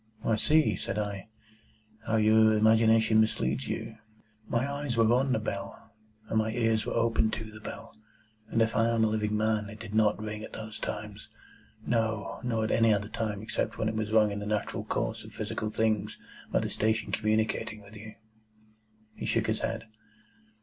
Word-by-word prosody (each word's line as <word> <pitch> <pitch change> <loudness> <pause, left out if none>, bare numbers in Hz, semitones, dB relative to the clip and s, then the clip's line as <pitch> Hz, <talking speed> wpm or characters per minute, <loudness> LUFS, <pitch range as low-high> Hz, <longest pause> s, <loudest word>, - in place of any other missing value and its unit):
"Why, 110 - +2
see," 150 -2 +3
said 95 - -4
I, 105 0 -3 0.8
"how 110 - +1
your 110 0 +5
imagination 110 0 +5
misleads 70 - 0
you. 110 - -4 0.5
My 120 +3 0
eyes 140 -4 -3
were 115 0 +5
on 130 +2 +2
the 125 - +3
bell, 100 -2 -6 0.3
and 110 - +1
my 110 0 +1
ears 115 -2 +1
were - - -1
open 115 -1 +2
to 110 0 -5
the 110 - -11
bell, 110 +1 -9 0.5
and 115 - +3
if 115 - -1
I 115 - +3
am 115 -1 +2
a - - +4
living 105 -1 0
man, 110 -1 0
it 105 0 -10
did 110 -2 -8
NOT 110 -1 +3
ring 105 0 -5
at - - -9
those 110 0 -7
times. - - -6 0.6
No, 110 -3 -1
nor 115 -3 0
at 110 - -1
any 115 -1 +4
other 100 0 0
time, 110 -3 -3
except 110 - -2
when 110 - 0
it - - -3
was 110 -1 -2
rung 110 -1 +4
in 100 - -3
the 105 - -5
natural 105 -1 -2
course - - -2
of - - -12
physical 110 - -3
things 110 -1 0 0.3
by - - +2
the - - -2
station 110 0 0
communicating 110 0 0
with 100 +2 -14
you." 110 +1 -10 1.0
He - - -6
shook - - +1
his - - 0
head. 115 -1 -2
110 Hz, 190 wpm, -29 LUFS, 105-115 Hz, 1.0 s, your